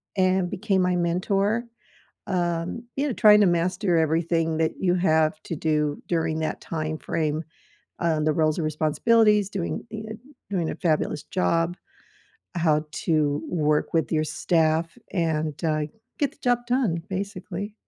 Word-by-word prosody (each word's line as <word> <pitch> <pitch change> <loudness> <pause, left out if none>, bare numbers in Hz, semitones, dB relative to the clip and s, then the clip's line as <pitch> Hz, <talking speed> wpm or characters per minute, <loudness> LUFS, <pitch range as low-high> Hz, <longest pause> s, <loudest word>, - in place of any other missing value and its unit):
and 185 -1 +2
became 195 -1 0
my 180 0 +2
mentor, 195 +6 +1 0.6
um, 175 +3 -2
you 280 - 0
know, 255 - -1
trying 210 -1 +6
to - - +6
master 175 +2 +1
everything 165 0 +1
that 160 -1 +1
you 180 -1 +2
have 160 -3 +2
to 165 - -4
do 150 -1 0
during 160 -2 0
that 155 - -3
time 155 -1 -3
frame, 155 0 -2 0.6
uh, 165 -2 +1
the 155 0 +2
roles 155 +1 +1
and 160 - -1
responsibilities, 210 +8 +3
doing 190 +1 -3
ee 220 0 -6
uh 220 - -5 0.3
doing 175 -5 -1
a - - -3
fabulous 155 -3 0
job, 170 -2 0 0.8
how 155 -2 +2
to 150 -3 0
work 150 -3 +1
with 165 0 +1
your 155 - +2
staff, 165 +1 +1 0.2
and, 160 -4 -1
uh, 155 -1 +1 0.4
get 285 -3 +1
the - - -24
job 245 -1 +3
done, 235 -10 +1
basically. 200 +1 -5
170 Hz, 150 wpm, -25 LUFS, 155-190 Hz, 0.8 s, trying